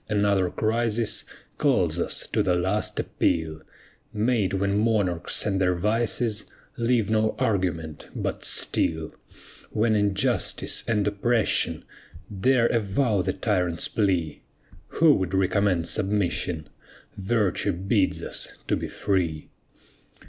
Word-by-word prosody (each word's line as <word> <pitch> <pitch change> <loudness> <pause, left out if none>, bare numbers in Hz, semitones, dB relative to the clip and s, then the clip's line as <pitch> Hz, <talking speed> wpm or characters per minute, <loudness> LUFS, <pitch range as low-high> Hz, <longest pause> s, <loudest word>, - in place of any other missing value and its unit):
another 100 -3 +2
crisis 115 +1 0 0.4
Calls - - +2
us - - +1
to - - 0
"the 90 -2 +2
last 95 +4 -1
appeal," 80 -1 -1 0.5
Made 110 -2 +1
when 100 +1 0
monarchs 105 -6 0
and 95 -3 0
their 90 -1 +2
vices 110 +3 0 0.3
Leave 115 -3 +1
no 110 0 +1
argument 85 -7 -2
but - - -3
steel. 80 -1 +1 0.6
When 110 +1 +1
injustice 105 +1 +1
and 105 -3 +1
oppression 110 +2 0 0.6
Dare 130 -3 +4
avow 110 -1 +1
the - - -1
tyrant's 90 -5 -1
plea. 90 -8 -1 0.5
Who 160 -1 +4
would 95 -5 -1
recommend 95 -2 +1
submission? 90 -4 -1 0.5
Virtue 100 -1 0
bids 95 +2 0
us - - -1 0.2
to - - +3
be - - -4
free. 85 -6 -2
100 Hz, 110 wpm, -25 LUFS, 90-110 Hz, 0.6 s, Dare